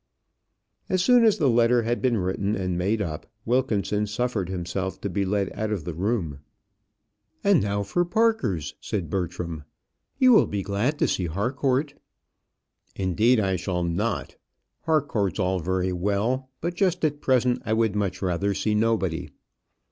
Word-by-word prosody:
As 185 -1 +2
soon 245 +3 +6
as 220 -3 +4
the 150 - +2
letter 120 0 +4
had 120 +2 -1
been 125 -3 +2
written 100 +2 -1
and 90 -3 -2
made 100 +5 0
up, 80 -4 -6 0.2
Wilkinson 105 -4 0
suffered 105 -3 -2
himself 95 +1 -3
to 100 - -3
be 100 +2 0
led 100 0 0
out 110 0 -3
of 100 -7 -2
the 85 - -5
room. 90 -5 -2 1.0
"And 200 -6 +4
now 100 0 -1
for 175 - 0
Parker's," 175 - 0
said 85 -7 -3
Bertram; 85 -4 -3 0.5
"you 260 -2 +6
will 220 - +6
be 100 -1 -3
glad 110 +10 -1
to - - +2
see 90 - -1
Harcourt." 130 - 0 1.0
"Indeed, 105 +6 +2
I 95 -3 +1
shall 90 0 -2
not. 85 +7 -2 0.5
Harcourt's 140 - +1
all 95 0 0
very 95 +2 -1
well; 105 +8 -1
but 170 +2 -2
just 180 -2 +1
at 145 -1 -1
present, 125 -1 +2
I 110 - -1
would 110 -2 +1
much 95 -3 -2
rather 95 +2 0
see 100 +2 0
nobody." 105 -6 0
105 Hz, 155 wpm, -25 LUFS, 95-125 Hz, 1.0 s, soon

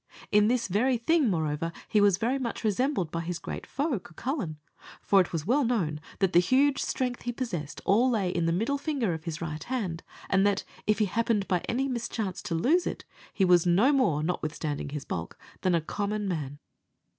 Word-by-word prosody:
In 210 0 +5
this 235 0 +1
very 240 +7 +2
thing, 290 +2 +2
moreover, 160 -2 -1 0.2
he 210 - +3
was 200 -3 +5
very 245 +5 0
much 245 -2 -4
resembled 215 - 0
by 165 - -2
his 170 +1 -3
great - - -7
foe, 280 -4 -1
Cucullin; 180 - -4 0.4
for 195 -1 +4
it 180 - -3
was 160 -3 -3
well 265 +8 +3
known 175 -11 0 0.2
that 195 -2 +1
the 170 - +7
huge 265 +9 +3
strength 250 -2 -2
he 240 - -2
possessed 180 - -4
all 230 +6 +4
lay 200 -7 +1
in 170 -2 0
the - - +2
middle 225 +11 0
finger 275 - -1
of 160 -1 -7
his 165 -2 -4
right 155 -2 -4
hand, 200 -10 -3 0.3
and 195 0 +3
that, 200 -1 +2 0.2
if 215 - +3
he 215 - +3
happened 210 0 0
by 180 - +2
any 265 +3 0
mischance 225 -6 -3
to 195 -5 -3
lose 300 - +2
it, - - -5 0.3
he 195 - +2
was 180 -1 +5
no 205 +12 +4
more, 165 - +2
notwithstanding 155 -3 -3
his 145 -1 -5
bulk, 85 0 -5 0.2
than 185 -2 +2
a 165 - +2
common 205 +5 -2
man. 145 -6 -3
200 Hz, 205 wpm, -28 LUFS, 170-245 Hz, 0.4 s, the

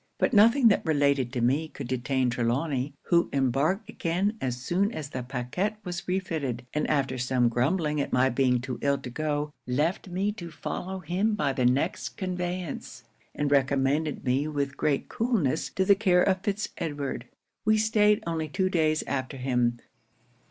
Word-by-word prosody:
But - - +1
nothing 230 +4 +6
that 200 - +2
related 140 -5 +2
to 125 - -1
me 140 +7 +2
could 140 -4 -8
detain 130 0 0
Trelawny, 130 +4 -1
who 170 0 +2
embarked 140 - +1
again 185 +6 -1
as 125 -2 -1
soon 180 - 0
as 155 -10 -6
the 130 - -3
pacquet 130 - -2
was 175 -1 -5
refitted, 160 -10 -2
and 150 - 0
after 135 -3 0
some 125 -1 +2
grumbling 150 +5 +1
at - - -3
my 130 +1 +3
being 125 -1 +2
too 125 -2 -5
ill 140 0 +2
to 130 -2 -8
go, 150 +1 -2 0.2
left 150 +10 0
me 190 +3 -1
to 175 -5 -8
follow 185 +3 -5
him 190 +6 0
by 145 -9 0
the 125 -2 +2
next 135 +8 -1
conveyance, 180 - -4 0.3
and 145 -1 -1
recommended 140 +2 +1
me 135 +4 +1
with 140 -2 -2
great 145 -2 0
coolness 205 - 0
to 190 - 0
the 200 - +7
care 185 -3 +3
of 190 -1 +1
Fitz 205 +1 -2
Edward. 145 -6 -3 0.4
'We 215 0 +4
staid 210 -1 +3
only 165 -2 -2
two 185 +5 0
days 155 -3 +2
after 135 0 -3
him. 125 -2 +1
150 Hz, 170 wpm, -27 LUFS, 130-185 Hz, 0.4 s, the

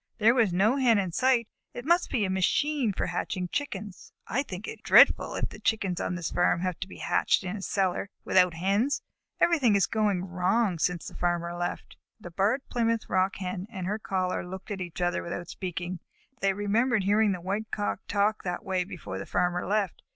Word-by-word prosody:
There 225 +1 +5
was 230 -6 +3
no 205 +9 +3
Hen 245 -5 +4
in 190 -3 -1
sight. 250 +3 +2 0.3
It 245 - -6
must 345 +3 +3
be 220 -5 +1
a - - -2
machine 250 +7 +1
for - - -2
hatching 180 +1 -3
Chickens. 210 -9 -5
I 255 - 0
think 200 -6 -7
it - - -7
is - - -32
dreadful - - +6
if - - -2
the - - -11
Chickens 195 -5 0
on 180 - -2
this 175 -2 -4
farm 175 -1 +2
have 185 -2 -2
to 190 - -4
be - - -11
hatched - - +1
in 185 +2 -4
a 205 - -6
cellar, 195 0 -1 0.2
without 180 -3 +4
Hens. 200 - +1 0.4
Everything 275 -11 +4
is 195 -3 +4
going 205 -5 0
wrong 185 +1 +1
since 175 0 0
the - - -8
Farmer 175 -1 -1
left." 175 0 -4 0.2
The 175 - -9
Barred 205 +10 0
Plymouth 230 -2 0
Rock 185 +1 +1
Hen 185 0 -4
and 190 -5 -5
her 210 +4 -2
caller 185 -3 -1
looked 190 +3 -8
at 195 -2 -4
each 175 0 -6
other 175 0 0
without 175 0 -6
speaking. 175 -1 -5 0.4
They 195 0 +2
remembered 210 +3 +1
hearing 205 +2 +3
the 185 - -2
White 200 +5 -3
Cock 205 -2 -2
talk 205 +1 +1
in 180 - -2
that 175 - -4
way 190 -2 0
before 170 - -7
the 100 - -7
Farmer 180 0 0
left. 200 -3 0
195 Hz, 210 wpm, -28 LUFS, 180-220 Hz, 0.4 s, dreadful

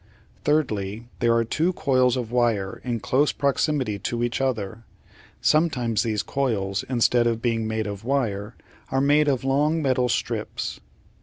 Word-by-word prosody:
Thirdly, 115 -7 0
there 115 -1 +3
are 115 - +3
two 165 +10 0
coils 130 -5 +2
of 120 -3 -4
wire 115 -6 0
in 120 -3 -2
close 140 +3 +2
proximity 140 -6 0
to 120 +4 -2
each 120 +2 -1
other. 115 -4 -2 0.6
Sometimes 125 -8 +2
these 110 -2 -1
coils, 100 -7 -1
instead 120 -1 +3
of 115 -1 0
being 115 -2 0
made 110 0 -2
of 100 0 -6
wire, 115 -5 -1 0.3
are 135 - +1
made 145 +2 +4
of 135 -3 +1
long 145 +4 +2
metal 130 -4 +1
strips. - - -3
120 Hz, 150 wpm, -24 LUFS, 110-135 Hz, 0.6 s, made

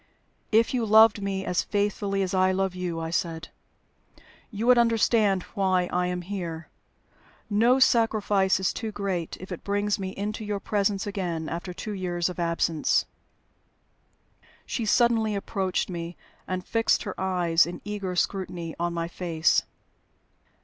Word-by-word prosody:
"If 225 +3 +3
you 245 -2 +1
loved 220 0 +6
me 195 -1 -2
as 180 - +1
faithfully 200 -1 -1
as 185 - -3
I 185 0 +3
love 190 0 0
you," 180 -2 -3
I 165 0 -4
said, 165 -1 -2 1.0
"you 220 0 -4
would 250 0 +6
understand 220 -4 +3
why 185 -2 +1
I 180 0 +1
am 180 0 -3
here. 170 -4 -5 0.8
No 235 +5 +4
sacrifice 215 -6 +3
is 190 - 0
too 225 -2 -4
great 190 -5 -3
if 185 +1 -10
it 180 - -6
brings 205 +1 0
me 190 -1 -3
into 210 +2 -3
your 205 -1 -2
presence 200 -1 0
again 175 -6 -3
after 170 +2 -5
two 195 +4 -6
years 175 -2 -1
of 180 - -7
absence." 170 -2 +1 1.6
She 230 - -3
suddenly 225 -2 +3
approached 195 -2 -1
me, 170 -1 -6 0.3
and 185 -1 -3
fixed 225 0 +1
her - - -4
eyes 175 -3 +2
in 175 - -6
eager 200 -3 -4
scrutiny 175 -3 -2
on 170 0 -1
my 165 0 -2
face. 170 -2 +1
190 Hz, 150 wpm, -26 LUFS, 175-210 Hz, 1.6 s, loved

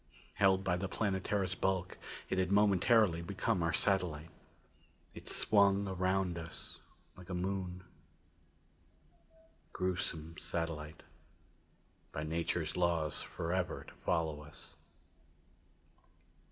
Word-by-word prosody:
Held 95 -1 +4
by 90 -2 +1
the 95 +1 -3
Planetara's 95 -2 0
bulk, 95 -1 -1 0.3
it 95 - 0
had 95 0 +1
momentarily 100 -2 +5
become 90 0 0
our 85 0 +2
satellite. 85 -4 +1 0.8
It - - -8
swung 100 -1 +4
around 95 -1 0
us 80 0 -6 0.4
like 90 0 -13
a 90 - -2
moon. 90 0 -2 1.9
Gruesome 85 -3 -2
satellite, 80 -2 -4 1.1
by 75 - -3
nature's 80 0 -1
laws 85 -4 +1
forever 90 +2 -2
to - - -12
follow 80 -3 -1
us. 75 -1 -11
90 Hz, 100 wpm, -34 LUFS, 85-95 Hz, 1.9 s, momentarily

